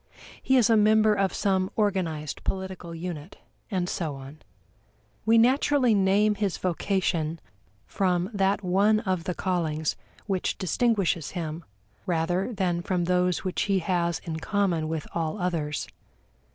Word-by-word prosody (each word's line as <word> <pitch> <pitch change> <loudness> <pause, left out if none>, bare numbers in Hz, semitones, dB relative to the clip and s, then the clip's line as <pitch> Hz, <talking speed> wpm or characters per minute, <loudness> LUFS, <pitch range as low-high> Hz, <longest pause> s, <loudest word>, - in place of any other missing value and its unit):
He 265 - +3
is 235 -4 +5
a 230 - +4
member 215 0 +5
of 195 -2 +1
some 190 -2 0
organized 175 -8 -1
political 190 -3 -4
unit, 170 0 -6 0.3
and 180 -3 -1
so 160 -5 -3
on. 135 +3 -11 0.9
We 225 +1 +6
naturally 255 +1 +4
name 200 +2 +3
his 200 -3 -1
vocation 170 -3 -1 0.5
from 180 0 0
that 200 0 +1
one 200 +4 +3
of 185 -6 -2
the 180 - -2
callings 160 -4 -1 0.3
which 190 -3 -1
distinguishes 195 -5 +1
him, 165 0 -4 0.4
rather 175 +5 0
than 180 -5 -1
from 180 0 -1
those 180 0 +1
which 185 -2 -2
he 195 - +3
has 170 -2 0
in 160 -2 -4
common 180 -4 0
with 160 -1 -3
all 165 +3 -2
others. 165 -5 -2
185 Hz, 140 wpm, -26 LUFS, 170-200 Hz, 0.9 s, We